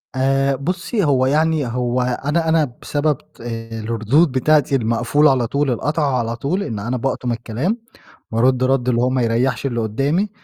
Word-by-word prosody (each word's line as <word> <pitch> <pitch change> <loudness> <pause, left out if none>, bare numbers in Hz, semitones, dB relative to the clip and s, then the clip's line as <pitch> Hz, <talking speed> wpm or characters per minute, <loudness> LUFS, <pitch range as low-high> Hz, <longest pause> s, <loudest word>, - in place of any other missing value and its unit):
آآ، 135 +1 +2
بُصّي، 180 - -2
هو 135 -4 +3
يعني 155 0 +1
هو 125 +1 -1
أنا 145 +6 -1
أنا 155 -6 +2
بسبب 145 -2 0 0.2
الردود 115 +5 0
بتاعتي 140 +1 +2
المقفولة 135 +5 +2
على 125 -3 +1
طول 140 +2 0
القاطعة 145 +1 0
على 115 0 -2
طول، 160 +12 -2
إن 110 - -4
أنا 120 +5 -2
باقطُم 125 -1 -2
الكلام، 120 - -2 0.5
وارُدّ 125 +3 +2
رَدّ 130 -1 +1
اللي 120 -1 +1
هو 125 - +2
ما 130 -1 0
يريّحش 120 +2 0
اللي 120 -3 -1
قدّامي، 135 - 0
130 Hz, 160 wpm, -19 LUFS, 120-150 Hz, 0.5 s, هو